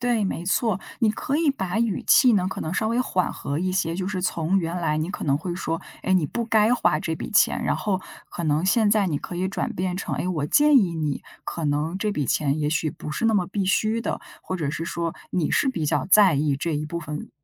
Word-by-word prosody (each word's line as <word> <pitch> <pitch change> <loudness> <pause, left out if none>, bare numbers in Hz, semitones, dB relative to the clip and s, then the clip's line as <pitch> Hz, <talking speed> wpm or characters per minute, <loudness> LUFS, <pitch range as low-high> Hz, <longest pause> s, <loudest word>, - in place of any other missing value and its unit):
对， 240 -4 +1
没 175 -2 -3
错， 195 0 +1 0.2
你 225 -3 +3
可 275 +6 -2
以 320 -2 +2
把 190 -7 -2
语 230 -4 0
气 250 -3 +6
呢， 185 -3 +2
可 - - -6
能 160 +3 -3
稍 220 - 0
微 235 +2 +1
缓 185 -7 0
和 140 +2 -4
一 185 0 0
些， 170 -3 0
就 185 +1 -3
是 185 -3 -3
从 180 +1 0
原 170 0 -2
来 155 -3 0
你 155 +3 -2
可 - - -6
能 140 -1 +1
会 175 +2 -4
说， 165 -2 -3 0.2
哎， 190 - 0
你 180 -5 +3
不 235 +9 -3
该 220 +1 +3
花 150 -10 +2
这 160 - -2
笔 - - -6
钱， 210 - +3
然 - - 0
后 195 -3 -1 0.3
可 175 - -6
能 155 +2 +1
现 210 +2 +3
在 205 -2 +3
你 155 - -1
可 175 +4 -6
以 185 +1 0
转 190 - -3
变 180 0 -2
成， - - -4
哎， - - -2
我 155 -6 -1
建 295 - +5
议 195 -9 +4
你 150 -3 -2 0.2
可 165 - -4
能 150 +4 0
这 210 0 0
笔 150 -8 -2
钱 145 +3 +1
也 150 -1 0
许 155 0 0
不 150 - -7
是 230 - -3
那 225 - +3
么 180 -3 +2
必 195 0 -2
须 215 +4 +1
的， - - -3 0.2
或 185 - -4
者 150 -5 -2
是 165 +1 -3
说 170 0 -3 0.2
你 175 -4 0
是 270 - +2
比 165 - -1
较 160 - +1
在 200 -6 +7
意 140 -1 +1
这 160 +2 -2
一 150 +1 -2
部 170 +3 -4
分 150 -2 -6
180 Hz, 280 characters per minute, -24 LUFS, 155-210 Hz, 0.3 s, 在